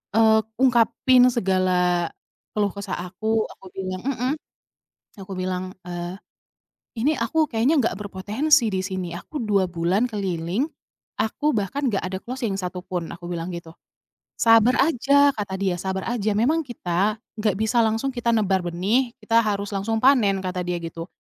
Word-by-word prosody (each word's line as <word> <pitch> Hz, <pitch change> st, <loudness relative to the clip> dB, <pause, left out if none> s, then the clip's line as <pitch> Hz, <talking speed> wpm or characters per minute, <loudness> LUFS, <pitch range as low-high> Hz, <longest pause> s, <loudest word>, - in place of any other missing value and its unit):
eee, 220 Hz, -1 st, +6 dB, 0.2 s
ungkapin 250 Hz, 0 st, +4 dB
segala 180 Hz, -5 st, +1 dB, 0.5 s
keluh 205 Hz, -2 st, +1 dB
kesah 200 Hz, 0 st, -5 dB, 0.2 s
aku, 220 Hz, +3 st, 0 dB
aku -, -, -16 dB
bilang 185 Hz, -1 st, -4 dB
mhm. 260 Hz, 0 st, 0 dB, 0.8 s
Aku 195 Hz, -1 st, -9 dB
bilang, 185 Hz, 0 st, -3 dB
eee, 175 Hz, 0 st, -5 dB, 0.8 s
"Ini 295 Hz, +7 st, +2 dB
aku 305 Hz, +7 st, +1 dB
kayaknya 255 Hz, +7 st, +3 dB
nggak 230 Hz, -, +1 dB
berpotensi 215 Hz, +8 st, +2 dB
di 190 Hz, -, -1 dB
sini, 185 Hz, -2 st, -4 dB
aku 295 Hz, -, -7 dB
2 200 Hz, -3 st, +2 dB
bulan 175 Hz, +5 st, +1 dB
keliling. 195 Hz, -, -2 dB, 0.5 s
Aku 290 Hz, +6 st, 0 dB
bahkan 245 Hz, +7 st, -1 dB
nggak 205 Hz, -5 st, 0 dB
ada 185 Hz, +1 st, -3 dB
closing 245 Hz, 0 st, -4 dB
yang -, -, -4 dB
satu 180 Hz, -1 st, -5 dB
pun," 180 Hz, -3 st, -4 dB
aku 175 Hz, 0 st, -9 dB
bilang 170 Hz, -1 st, -3 dB
gitu. 170 Hz, -1 st, -9 dB, 0.6 s
"Sabar 225 Hz, +2 st, +5 dB
aja," 285 Hz, -1 st, +4 dB
kata 205 Hz, -6 st, -4 dB
dia, 190 Hz, -2 st, 0 dB
"sabar 190 Hz, +1 st, -3 dB
aja 215 Hz, -3 st, 0 dB
memang 300 Hz, +10 st, +2 dB
kita 200 Hz, -3 st, 0 dB, 0.2 s
nggak 210 Hz, -3 st, +1 dB
bisa 220 Hz, +2 st, +2 dB
langsung 225 Hz, +4 st, +1 dB
kita 240 Hz, -2 st, 0 dB
nebar 200 Hz, -3 st, +2 dB
benih, 195 Hz, +9 st, 0 dB
kita 225 Hz, +2 st, +4 dB
harus 205 Hz, -2 st, -1 dB
langsung 210 Hz, +3 st, -1 dB
panen," 230 Hz, -8 st, +4 dB
kata 180 Hz, -1 st, -2 dB
dia 175 Hz, -1 st, -1 dB
gitu. 165 Hz, 0 st, -6 dB
205 Hz, 155 wpm, -23 LUFS, 185-235 Hz, 0.8 s, eee